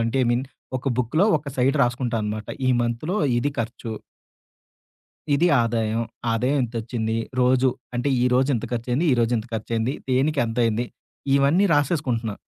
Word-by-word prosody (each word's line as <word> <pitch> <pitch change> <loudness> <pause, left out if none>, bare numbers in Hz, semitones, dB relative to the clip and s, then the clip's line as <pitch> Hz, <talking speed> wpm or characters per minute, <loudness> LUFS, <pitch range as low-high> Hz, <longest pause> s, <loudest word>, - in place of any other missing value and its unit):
అంటే 115 +3 0
I - - 0
mean 120 +2 +1 0.3
ఒక 130 +2 -3
బుక్కులో 155 - +2
ఒక 145 -1 -7
సైడ్ 135 +3 +2
రాసుకుంటా 125 -1 0
అనమాట. 105 0 -4 0.2
ఈ - - +3
మంత్‌లో 120 - -2 0.2
ఇది 145 +4 0
ఖర్చు. 115 0 -4 1.4
ఇది 170 +5 +3
ఆదాయం. 115 -1 0 0.3
ఆదాయం 125 +5 +1
ఇంతొచ్చింది, 115 -1 -2 0.2
రోజు 130 +1 +4 0.3
అంటే 125 +4 0
ఈ - - +3
రోజు 130 +2 +3
ఇంత - - -4
ఖర్చు 120 +1 -3
అయింది, 155 +8 +1
ఈ - - +5
రోజు 115 +1 +1
ఇంత 110 - -6
ఖర్చు 110 +1 -5
అయింది, 115 +4 0 0.2
దేనికి 140 +3 +2
ఎంత 115 +2 -5
అయింది, 115 +2 0 0.5
ఇవన్నీ 145 +8 +3
రాసేసుకుంటున్నా. 130 - 0
125 Hz, 165 wpm, -23 LUFS, 115-140 Hz, 1.4 s, ఈ